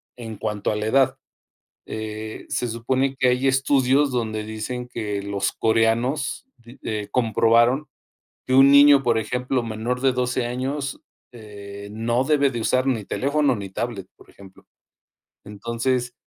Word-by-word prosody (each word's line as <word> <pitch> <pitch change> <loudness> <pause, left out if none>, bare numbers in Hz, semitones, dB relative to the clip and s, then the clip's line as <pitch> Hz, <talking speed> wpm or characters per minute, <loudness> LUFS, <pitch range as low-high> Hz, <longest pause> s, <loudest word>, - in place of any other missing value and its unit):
en 115 -3 -8
cuanto 105 -1 -2
a - - -1
la 105 0 -3
edad. 135 +4 +2 0.7
Eh, 110 0 -6
se 125 - -2
supone 130 +4 -1
que 130 - +3
hay 125 +2 +1
estudios 135 +1 +2
donde 110 -4 -2
dicen 110 +3 -5
que 105 -4 -4
los 100 0 -2
coreanos, 115 - 0
de 120 +2 -16
eh, 105 -2 -4
comprobaron 120 +3 +3 0.6
que 130 - 0
un 135 +1 +7
niño, 140 0 +7
por 120 -3 +2
ejemplo, 125 +3 -1
menor 115 +3 -3
de 135 0 +3
12 125 0 -1
años, 135 +3 -3 0.3
eh, 100 -2 -10
no 115 +4 0
debe 140 -1 +3
de 120 -2 -4
usar 130 +3 +1
ni 120 -6 0
teléfono 145 +3 0
ni 100 -2 -7
tablet, 100 -2 -4
por - - -19
ejemplo. 95 -1 -17 0.8
Entonces, 115 +4 -2
120 Hz, 150 wpm, -23 LUFS, 110-130 Hz, 0.8 s, un